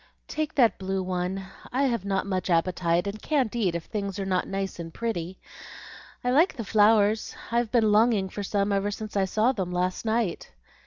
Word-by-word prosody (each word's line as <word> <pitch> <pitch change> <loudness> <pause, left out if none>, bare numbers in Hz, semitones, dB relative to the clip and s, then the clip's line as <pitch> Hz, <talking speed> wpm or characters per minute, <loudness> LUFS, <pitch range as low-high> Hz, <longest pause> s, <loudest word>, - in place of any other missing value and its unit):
"Take 310 -1 -3
that 240 -5 +4
blue 190 0 -2
one. 185 +1 -2 0.3
I 265 +3 +1
have 235 -7 0
not 195 -1 0
much 185 -2 -2
appetite, 170 0 +1
and 205 +2 -5
can't 265 -7 0
eat 195 -8 +1
if 170 - -3
things 200 -2 -4
are 195 - -3
not 185 -1 0
nice 195 -2 -3
and 165 -1 -6
pretty. 190 -4 -3 0.9
I 250 - +1
like 320 +8 +4
the 235 - -4
flowers. 215 0 +3 0.2
I've 235 -1 +1
been 225 -4 +3
longing 215 -2 +4
for 205 - -5
some 200 0 0
ever 200 +1 +1
since 215 +1 -6
I 195 -1 +3
saw 215 +6 +2
them 190 -8 -3
last 180 +1 -1
night." 220 -5 -1
200 Hz, 195 wpm, -26 LUFS, 185-225 Hz, 0.9 s, that